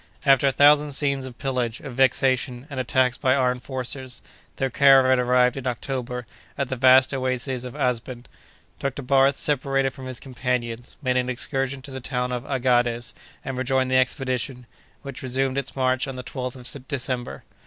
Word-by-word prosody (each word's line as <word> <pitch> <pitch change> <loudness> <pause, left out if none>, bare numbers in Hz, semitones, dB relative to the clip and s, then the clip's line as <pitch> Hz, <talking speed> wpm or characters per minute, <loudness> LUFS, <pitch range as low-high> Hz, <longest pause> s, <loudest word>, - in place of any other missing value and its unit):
After 135 0 +5
a - - +3
thousand 145 +1 +5
scenes 140 -1 +1
of 125 -1 -11
pillage, 125 -4 -2
of 135 - -8
vexation, 130 -1 +1
and 135 - -4
attacks 130 -1 +1
by 130 -1 +3
armed 125 -2 +1
forces, 130 0 -5 0.3
their 135 -1 -2
caravan 135 -1 +5
arrived, 125 +1 +3
in 135 -1 -4
October, 125 0 -4 0.3
at 140 -2 -2
the 130 - -2
vast 130 +1 +5
oasis 130 -1 -2
of 125 -1 -8
Asben. 125 0 -2 0.5
Dr. 140 0 -3
Barth 135 +1 +3
separated 135 -2 0
from 130 -1 -9
his 130 -2 -5
companions, 125 -2 -4
made 130 -1 +1
an 125 0 0
excursion 135 +1 -2
to 135 - -8
the 130 - -5
town 125 0 -2
of 125 +1 -4
Aghades, 120 -3 +1 0.3
and 130 -1 -4
rejoined 130 0 0
the 130 - +4
expedition, 130 -1 -1 0.4
which 140 -2 -8
resumed 130 +1 0
its 135 - -5
march 130 -1 +1
on 135 - -5
the 125 - -6
12th 125 -1 -5 0.2
of 135 -2 -11
December. 125 -3 -4
130 Hz, 175 wpm, -24 LUFS, 125-135 Hz, 0.5 s, After